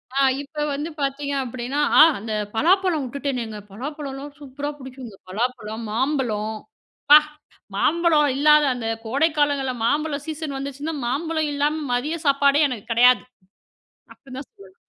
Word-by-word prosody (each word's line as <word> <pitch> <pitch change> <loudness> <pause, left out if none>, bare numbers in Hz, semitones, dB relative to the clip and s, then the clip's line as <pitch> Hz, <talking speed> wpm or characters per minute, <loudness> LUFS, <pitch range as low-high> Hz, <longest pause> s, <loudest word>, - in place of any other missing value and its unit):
ஆ, - - +2 0.2
இப்ப 295 +1 -5
வந்து 295 +4 -3
பாத்தீங்க 280 +1 -2
அப்படின்னா 250 +4 -4 0.2
அ - - +11 0.2
அந்த 220 +1 -5 0.2
பலாப்பழம் 350 - +2
உட்டுட்டேனேங்க 250 -5 -4
பலாப்பழம்லாம் 280 +3 -7
சூப்பரா 285 +1 -6
புடிக்குங்க. 260 -5 -10
பலாப்பழம், 220 +1 -3
மாம்பழம் 250 -3 0 0.7
ப்பா 295 - +11 0.6
மாம்பழம் 335 -2 +3 0.2
இல்லாத 300 +2 +5
அந்த 235 -2 -5 0.2
கோடைக்காலங்கள்ல 285 0 +1
மாம்பழம் 295 +3 0
சீசன் 315 -3 -5
வந்துச்சுன்னா, 280 +3 -5
மாம்பழம் 315 +6 -1
இல்லாம 295 +2 0
மதிய 290 +7 -1
சாப்பாடே 280 +1 +4
எனக்கு 235 -3 -7
கெடையாது, 245 +2 +5 0.9
அப்படின்னு 260 -1 -12
தான் 275 - -9
சொல்லணும். 190 -1 -17
280 Hz, 125 wpm, -22 LUFS, 250-300 Hz, 0.9 s, அ